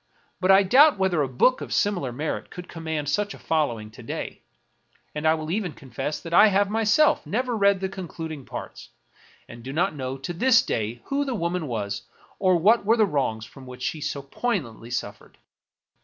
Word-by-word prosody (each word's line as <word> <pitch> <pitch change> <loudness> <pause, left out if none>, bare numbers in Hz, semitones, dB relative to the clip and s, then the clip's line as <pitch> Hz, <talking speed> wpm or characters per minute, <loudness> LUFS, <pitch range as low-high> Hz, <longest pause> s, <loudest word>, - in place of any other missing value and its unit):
But 185 - 0
I 195 +1 +7
doubt 270 +7 +6
whether 190 -5 +1
a 140 - +1
book 135 - +2
of - - -7
similar 180 -11 0
merit 150 +6 -4
could 180 0 -9
command 160 -3 -4
such 205 +7 -1
a - - -12
following 120 -10 -1
to 110 - -13
day; - - -6 0.7
and 150 +1 -1
I 160 - +5
will 155 0 -5
even 190 -4 -2
confess 135 +3 -5
that 165 - -7
I 215 - +8
have 200 0 +2
myself 225 +8 +3
never 245 +2 -1
read 200 -2 +3
the 190 - 0
concluding 165 -6 -7
parts, - - -8 0.6
and 115 0 -11
do 130 +3 -7
not 175 +6 +1
know 130 -2 -4
to 135 +6 -5
this 235 +6 +4
day 110 +2 -3
who 280 +1 0
the 270 -3 -3
woman 170 -4 -2
was 100 -4 -3 0.4
or 185 -1 +4
what 205 +8 +4
were 225 +3 +3
the 220 - +5
wrongs 130 - -1
from 130 +3 -14
which 125 0 -9
she 155 +3 -2
so 140 -1 -3
poignantly 135 - -3
suffered. 120 -4 -6
165 Hz, 195 wpm, -25 LUFS, 135-200 Hz, 0.7 s, I